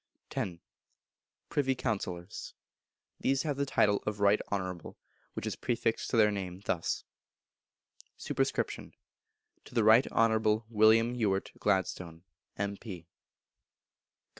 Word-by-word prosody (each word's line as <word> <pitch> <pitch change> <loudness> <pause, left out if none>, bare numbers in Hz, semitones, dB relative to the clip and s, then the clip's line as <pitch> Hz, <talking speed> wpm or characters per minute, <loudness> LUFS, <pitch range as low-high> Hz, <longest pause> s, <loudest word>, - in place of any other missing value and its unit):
x. 90 -3 -2 0.9
Privy 135 -2 +1
Councillors. 95 -5 -4 0.6
These 135 -1 +1
have 150 -3 -1
the 140 0 0
title 105 -6 +3
of 105 -1 -2
Right 100 +1 +4
Honourable, 95 -4 -4 0.4
which - - -5
is - - -2
prefixed 115 -2 -1
to - - +1
their 105 -1 +6
name 95 -3 -4
thus: 85 -3 -1 1.1
Sup. - - -6
To - - 0 0.9
the 115 - +4
Right 110 +4 +6
Honourable 110 -1 +2
William 110 +2 +5
Ewart 100 -5 0
Gladstone, 90 -4 -1 0.3
M.P. 100 -3 -5
105 Hz, 110 wpm, -31 LUFS, 95-115 Hz, 1.1 s, their